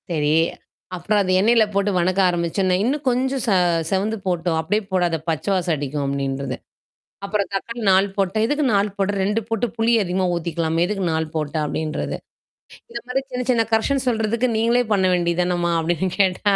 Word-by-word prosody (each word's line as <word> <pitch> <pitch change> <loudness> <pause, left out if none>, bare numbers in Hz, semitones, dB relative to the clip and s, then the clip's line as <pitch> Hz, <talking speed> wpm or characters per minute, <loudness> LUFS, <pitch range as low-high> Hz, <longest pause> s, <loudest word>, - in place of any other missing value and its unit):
சரி. 150 -3 +1 0.6
அப்புறம் 205 +4 0
அத 185 -2 0
எண்ணெயில 225 +3 +4
போட்டு 200 +1 +1
வணக்க 185 +2 +1
ஆரம்பிச்சோன்னே. 175 +2 0
''இன்னும் 280 +6 -1
கொஞ்சம் 260 +2 0
ச - - +2 0.4
செவந்து 205 +4 0
போட்டும் 175 -2 0
அப்படியே 205 +7 0
போடாத 175 -3 +1
பச்ச 160 -2 -2
வாசம் 180 -3 0
அடிக்கும்'' 145 0 -3
அப்டின்றது. 135 -1 -2 0.7
அப்புறம் 200 -1 -1
தக்காளி 230 +5 -4
4 190 +1 +4
போட்டா 195 +2 0
''எதுக்கு 290 +5 0
4 200 +1 +2
போட்ற? 200 +1 0
2 210 +3 0
போட்டு 225 +1 0
புளி 225 +1 +2
அதிகமா 185 +1 0
ஊத்திக்கலாமே 170 -1 -1
எதுக்கு 195 -1 -2
4 160 0 0
போட்ட?'' 155 0 -2
அப்டின்றது. 155 +1 -3 0.7
இந்த 235 0 -5
மாரி 260 +2 -1
சின்ன 250 0 -2
சின்ன 230 -2 +3
கரெக்ஷன் 265 +5 +1
சொல்றதுக்கு 230 +1 +1
நீங்களே 235 +2 +3
பண்ண 195 -2 +3
வேண்டிதானம்மா 175 0 0
அப்டின்னு 175 +3 -1
கேட்டா, 195 +1 +2
190 Hz, 165 wpm, -21 LUFS, 170-220 Hz, 0.7 s, எண்ணெயில